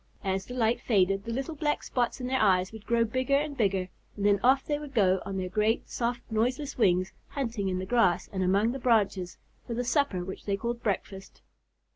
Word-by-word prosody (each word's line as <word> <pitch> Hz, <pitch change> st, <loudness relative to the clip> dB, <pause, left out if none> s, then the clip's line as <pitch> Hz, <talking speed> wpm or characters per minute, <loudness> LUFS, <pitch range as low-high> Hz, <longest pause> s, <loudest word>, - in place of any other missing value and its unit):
As 190 Hz, -1 st, -2 dB
the 250 Hz, -, -7 dB
light 230 Hz, -1 st, +1 dB
faded, 195 Hz, -3 st, +2 dB
the 230 Hz, -, -4 dB
little 270 Hz, +7 st, -3 dB
black 300 Hz, -1 st, -1 dB
spots 245 Hz, 0 st, -1 dB
in 250 Hz, -, -4 dB
their 260 Hz, +1 st, 0 dB
eyes 185 Hz, -3 st, +3 dB
would 220 Hz, -1 st, -11 dB
grow 235 Hz, -1 st, +3 dB
bigger 255 Hz, +4 st, 0 dB
and 290 Hz, 0 st, 0 dB
bigger, 195 Hz, -6 st, +1 dB, 0.3 s
and 200 Hz, -, -2 dB
then 205 Hz, -1 st, +4 dB
off 265 Hz, +2 st, +4 dB
they 295 Hz, -1 st, -1 dB
would 290 Hz, -2 st, -9 dB
go 190 Hz, -4 st, +3 dB
on 195 Hz, -, -3 dB
their 185 Hz, -1 st, -2 dB
great 215 Hz, +4 st, 0 dB
soft, 240 Hz, 0 st, -1 dB
noiseless 250 Hz, +6 st, 0 dB
wings, 185 Hz, -5 st, +2 dB
hunting 230 Hz, -8 st, -2 dB
in 185 Hz, -, -1 dB
the 185 Hz, -, -3 dB
grass 215 Hz, -5 st, +2 dB
and 190 Hz, -, -1 dB
among 200 Hz, +5 st, +2 dB
the 270 Hz, -, -5 dB
branches 205 Hz, -7 st, +1 dB, 0.3 s
for 235 Hz, -, -3 dB
the 245 Hz, -, -1 dB
supper 240 Hz, -, +1 dB
which 190 Hz, -, -8 dB
they 200 Hz, -1 st, 0 dB
called 235 Hz, +2 st, -3 dB
breakfast. 195 Hz, -2 st, -4 dB
225 Hz, 215 wpm, -28 LUFS, 195-250 Hz, 0.3 s, then